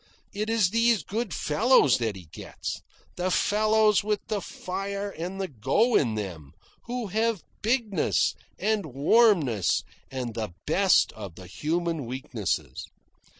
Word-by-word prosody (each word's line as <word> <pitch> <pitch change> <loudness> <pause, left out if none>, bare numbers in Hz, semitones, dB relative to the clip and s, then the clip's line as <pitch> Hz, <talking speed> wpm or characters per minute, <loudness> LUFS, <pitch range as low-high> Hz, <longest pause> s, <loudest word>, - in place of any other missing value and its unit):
It 215 +2 -2
is 220 -5 +2
these 230 -5 +3
good 220 - -3
fellows 150 - +3
that 110 -4 -1
he 90 -2 -11
gets - - -6 0.4
the 180 +1 0
fellows 215 +2 +3
with 210 -1 0
the 210 -2 -1
fire 200 +3 -4
and 185 +2 -6
the 190 - -1
go 140 - +1
in 115 -6 +2
them, 85 -9 -6 0.3
who 240 -3 -4
have 220 -3 +1 0.2
bigness, 225 -3 +1 0.2
and 215 -1 0
warmness, 145 - +3 0.3
and 125 -3 -4
the 110 -5 -4
best 190 +4 +4
of 100 -6 -8
the 95 - -11
human 160 - -2
weaknesses. 110 - -3
185 Hz, 135 wpm, -27 LUFS, -, 0.4 s, best